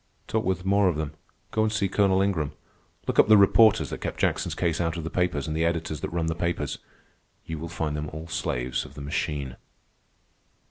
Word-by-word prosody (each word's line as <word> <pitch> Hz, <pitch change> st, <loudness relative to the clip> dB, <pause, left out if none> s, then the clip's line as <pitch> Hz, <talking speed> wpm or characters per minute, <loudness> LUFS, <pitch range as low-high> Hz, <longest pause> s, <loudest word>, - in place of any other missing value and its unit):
Talk 110 Hz, 0 st, 0 dB
with 95 Hz, -1 st, -1 dB
more 100 Hz, 0 st, +4 dB
of 85 Hz, -, -1 dB
them. 75 Hz, -1 st, -3 dB, 0.4 s
Go 110 Hz, -, +1 dB
and 110 Hz, 0 st, +2 dB
see 105 Hz, -3 st, +1 dB
Colonel 95 Hz, 0 st, +3 dB
Ingram. 80 Hz, -8 st, -1 dB, 0.5 s
Look -, -, 0 dB
up -, -, +7 dB
the 110 Hz, 0 st, +8 dB
reporters 105 Hz, +2 st, +5 dB
that -, -, -5 dB
kept -, -, -4 dB
Jackson's -, -, 0 dB
case 85 Hz, -1 st, 0 dB
out 85 Hz, 0 st, -1 dB
of 85 Hz, -, -4 dB
the 80 Hz, -, -5 dB
papers, 90 Hz, -6 st, 0 dB
and 80 Hz, -, -2 dB
the 80 Hz, -, +1 dB
editors 80 Hz, -3 st, -1 dB
that -, -, -3 dB
run 85 Hz, -1 st, -1 dB
the 80 Hz, -, 0 dB
papers. 85 Hz, +1 st, -2 dB, 0.7 s
You 80 Hz, -1 st, -5 dB
will 85 Hz, +1 st, -6 dB
find 80 Hz, -3 st, -2 dB
them 75 Hz, 0 st, -3 dB
all 80 Hz, +2 st, -7 dB
slaves 65 Hz, -5 st, -2 dB
of 70 Hz, -, -13 dB
the 70 Hz, -, -8 dB
machine." 70 Hz, -2 st, -3 dB
85 Hz, 215 wpm, -26 LUFS, 75-95 Hz, 0.7 s, the